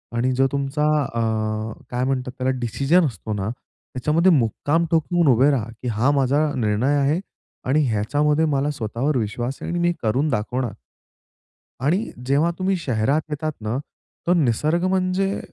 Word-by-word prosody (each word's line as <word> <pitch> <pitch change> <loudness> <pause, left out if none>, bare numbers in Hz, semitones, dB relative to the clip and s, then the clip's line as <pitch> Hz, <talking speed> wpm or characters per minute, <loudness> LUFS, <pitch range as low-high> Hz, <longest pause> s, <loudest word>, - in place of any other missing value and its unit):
आणि 125 +2 +1
जो 135 +1 +3
तुमचा 140 +2 -1 0.2
अं, 110 -2 -2 0.2
काय 125 +1 -1
म्हणतात 130 -1 -1
त्याला 130 0 0
डिसिजन 140 +9 +2
असतो 110 -4 -4
ना, 105 0 -2 0.4
त्याच्यामध्ये 155 +8 +3
मुक्काम 145 +5 +1
ठोकून 165 +1 +2
उभे 130 +5 +4
राहा, 115 -5 -1
की 125 - -5
हा 120 +5 +2
माझा 140 +3 +2
निर्णय 115 +4 +1
आहे 145 +5 +2 0.5
आणि 150 +3 +4
ह्याच्यामध्ये 145 +9 +1
मला 145 -1 +1
स्वतःवर 130 +3 -1
विश्वास 120 +4 -2
आहे - - -5
आणि 175 - -1
मी 175 - +2
हे 175 - +2
करून 130 +8 +1
दाखवणार. 120 0 -2 1.1
आणि 180 +11 +1
जेव्हा 145 +6 +2
तुम्ही 190 +1 +1
शहरात 135 -1 0
येतात 155 +1 -2
ना, 110 +3 -2 0.5
तर 175 - +5
निसर्ग 155 +2 +1
म्हणजे 190 +1 0
135 Hz, 155 wpm, -22 LUFS, 115-155 Hz, 1.1 s, तर